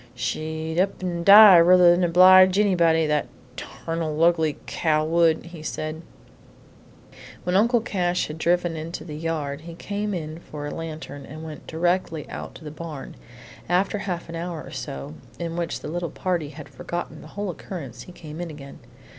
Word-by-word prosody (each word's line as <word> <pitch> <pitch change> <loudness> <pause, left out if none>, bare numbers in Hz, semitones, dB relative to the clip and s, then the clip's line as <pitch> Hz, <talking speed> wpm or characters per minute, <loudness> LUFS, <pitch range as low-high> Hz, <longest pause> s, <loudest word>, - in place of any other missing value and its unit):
"She'd 160 +4 -3
up 190 0 0
an' 175 -2 -2
die 200 0 +10
ruther 175 +1 +7
'n 175 +1 +1
obleege 185 +2 +7
anybody, 170 -6 +3
that 150 -1 0 0.3
tarnal, 165 -1 -3
ugly 160 -3 +2
cow 155 -2 0
would!" 165 0 +2
he 170 -2 -10
said. 155 +1 -5 1.4
When 180 - -1
Uncle 235 +4 +4
Cash 180 -5 -1
had 155 +1 -8
driven 175 0 +1
into 160 0 -6
the 150 -3 -7
yard, 150 -3 -3
he 165 +1 -10
came 205 +2 -3
in 155 -1 -6
for 150 -3 -8
a 145 - -5
lantern, 155 -3 -7
and 155 +3 -9
went 155 -2 -9
directly 165 -2 -1
out - - -7
to - - -12
the 150 - -7
barn. 155 -3 -8 0.5
After 190 +3 +1
a 205 - -7
half 175 -2 -4
hour 165 -1 -5
or - - -11
so, 70 +2 -6 0.2
in 170 -1 -4
which 170 -1 -3
the - - -7
little 170 +2 -3
party 175 -5 -2
had 155 -1 -10
forgotten 175 - -6
the - - -12
whole 200 -2 -2
occurrence, 140 - -8
he 180 - -11
came 160 -1 -9
in 175 - -5
again. 140 -3 -11
165 Hz, 175 wpm, -24 LUFS, 155-180 Hz, 1.4 s, die